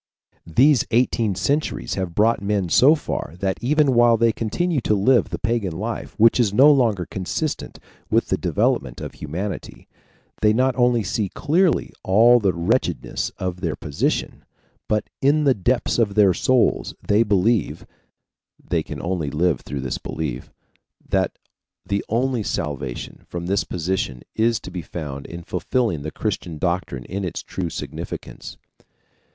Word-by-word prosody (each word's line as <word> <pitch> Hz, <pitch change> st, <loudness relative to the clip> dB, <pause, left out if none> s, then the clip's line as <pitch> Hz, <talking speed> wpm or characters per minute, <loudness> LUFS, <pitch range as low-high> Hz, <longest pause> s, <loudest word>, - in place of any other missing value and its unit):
These 125 Hz, -, +4 dB
eighteen 115 Hz, -3 st, +1 dB
centuries 145 Hz, -, -1 dB
have 95 Hz, -3 st, -3 dB
brought 110 Hz, +1 st, +3 dB
men 100 Hz, -3 st, -1 dB
so 140 Hz, -, +6 dB
far 85 Hz, -, -5 dB
that 95 Hz, 0 st, -2 dB
even 145 Hz, +2 st, +3 dB
while 120 Hz, -1 st, +5 dB
they 115 Hz, 0 st, +3 dB
continue 140 Hz, +8 st, -1 dB
to 105 Hz, -, +1 dB
live 115 Hz, +3 st, +3 dB
the 85 Hz, -, -4 dB
pagan 105 Hz, -4 st, -1 dB
life 110 Hz, +3 st, -5 dB
which 115 Hz, +3 st, +5 dB
is 115 Hz, -5 st, +3 dB
no 135 Hz, +8 st, +7 dB
longer 115 Hz, -10 st, +2 dB
consistent 95 Hz, -, -4 dB, 0.3 s
with -, -, +1 dB
the -, -, +1 dB
development -, -, 0 dB
of -, -, -6 dB
humanity, 90 Hz, +7 st, -6 dB, 0.5 s
they 105 Hz, 0 st, +4 dB
not 130 Hz, +2 st, +2 dB
only 120 Hz, -2 st, +3 dB
see 100 Hz, +1 st, -1 dB
clearly 165 Hz, -, +1 dB
all 115 Hz, +6 st, +5 dB
the 100 Hz, -4 st, +2 dB
wretchedness 85 Hz, -1 st, -1 dB
of 90 Hz, -1 st, -4 dB
their -, -, -1 dB
position, 70 Hz, -, -2 dB, 0.4 s
but 105 Hz, 0 st, 0 dB
in 145 Hz, +3 st, +3 dB
the 140 Hz, -2 st, +4 dB
depths 120 Hz, +4 st, 0 dB
of 105 Hz, -4 st, +1 dB
their 100 Hz, -3 st, +5 dB
souls 125 Hz, +7 st, +1 dB
they 105 Hz, +2 st, +4 dB
believe 105 Hz, 0 st, +1 dB, 0.7 s
(they -, -, -1 dB
can -, -, -7 dB
only 85 Hz, -4 st, -1 dB
live 75 Hz, -1 st, +1 dB
through 70 Hz, 0 st, -5 dB
this 65 Hz, -1 st, -3 dB
belief) 70 Hz, -5 st, -5 dB, 0.6 s
that -, -, 0 dB, 0.5 s
the 100 Hz, 0 st, -1 dB
only 125 Hz, +1 st, 0 dB
salvation 70 Hz, -10 st, -4 dB
from 85 Hz, 0 st, -5 dB
this 95 Hz, +2 st, +1 dB
position 85 Hz, -7 st, -3 dB
is 115 Hz, 0 st, +1 dB
to -, -, -10 dB
be 90 Hz, -1 st, -4 dB
found 75 Hz, -4 st, -7 dB
in 85 Hz, 0 st, -8 dB
fulfilling 110 Hz, -, -1 dB
the 75 Hz, -, -4 dB
Christian 90 Hz, -4 st, -4 dB
doctrine 85 Hz, -7 st, -2 dB
in 100 Hz, +2 st, -4 dB
its 90 Hz, -, -4 dB
true 90 Hz, -3 st, -4 dB
significance. -, -, -7 dB
105 Hz, 155 wpm, -22 LUFS, 85-120 Hz, 0.7 s, no